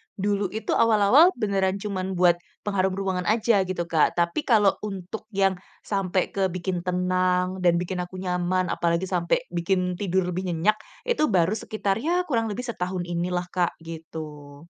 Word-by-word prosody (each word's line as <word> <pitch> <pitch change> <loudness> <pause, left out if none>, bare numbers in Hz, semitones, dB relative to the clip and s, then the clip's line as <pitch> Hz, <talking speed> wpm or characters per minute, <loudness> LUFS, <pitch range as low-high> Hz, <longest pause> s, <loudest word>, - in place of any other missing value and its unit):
dulu 200 0 0
itu 220 - -3
awal-awal 230 - +5
beneran 195 -4 0
cuman 190 -2 -3
buat 175 -1 +4 0.2
pengharum 190 -2 0
ruangan 190 -2 -2
aja 215 -3 +3
gitu 180 -1 -2
Kak, 160 -2 +3
tapi 170 - 0
kalau 210 -5 +4
untuk 195 +1 -6
yang 195 -1 +2 0.3
sampai 190 -2 0
ke 195 -1 0
bikin 180 0 -3
tenang 180 0 +1
dan 175 -1 +5
bikin 180 +1 -4
aku 180 +1 -5
nyaman 180 0 0
apalagi 170 +2 0
sampai 175 +2 +1
bikin 180 +1 -1
tidur 190 -1 +1
lebih 185 +2 -3
nyenyak 205 +7 +2 0.3
itu 475 -10 +3
baru 185 +4 +3
sekitar 205 -2 -2
ya 335 +9 +1
kurang 230 -4 +1
lebih 220 +2 -3
setahun 185 -6 -3
ini 175 +1 -2
lah 175 0 -1
Kak, 180 -1 0
gitu. 155 -3 -9
185 Hz, 160 wpm, -25 LUFS, 175-205 Hz, 0.3 s, awal-awal